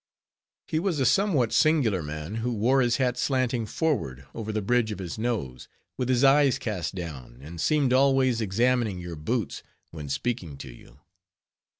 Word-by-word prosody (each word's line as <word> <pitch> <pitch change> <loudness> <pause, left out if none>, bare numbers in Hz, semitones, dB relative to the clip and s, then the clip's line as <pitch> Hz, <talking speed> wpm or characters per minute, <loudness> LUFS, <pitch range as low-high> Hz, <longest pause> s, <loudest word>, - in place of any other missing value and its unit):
He 155 - -1
was 170 -4 -1
a 130 - +2
somewhat 150 - +2
singular 135 - +3
man, 75 +7 -6
who 120 +2 -2
wore 125 +5 +2
his 120 -1 +2
hat 125 -2 0
slanting 125 -4 0
forward 70 - -2
over 110 -1 -5
the 110 - -1
bridge 120 +1 +1
of 105 - -4
his 95 +2 -6
nose, 105 - -3 0.3
with 125 -1 -3
his 130 0 +2
eyes 135 -1 +5
cast 105 - -4
down, 70 -9 -7
and 80 +2 -7
seemed 145 -5 +2
always 130 -3 +3
examining 115 0 +1
your 90 -1 -7
boots, 105 +8 -3 0.3
when 75 -3 -8
speaking 85 - -3
to 65 -2 -9
you. - - -18
115 Hz, 170 wpm, -26 LUFS, 85-130 Hz, 0.3 s, eyes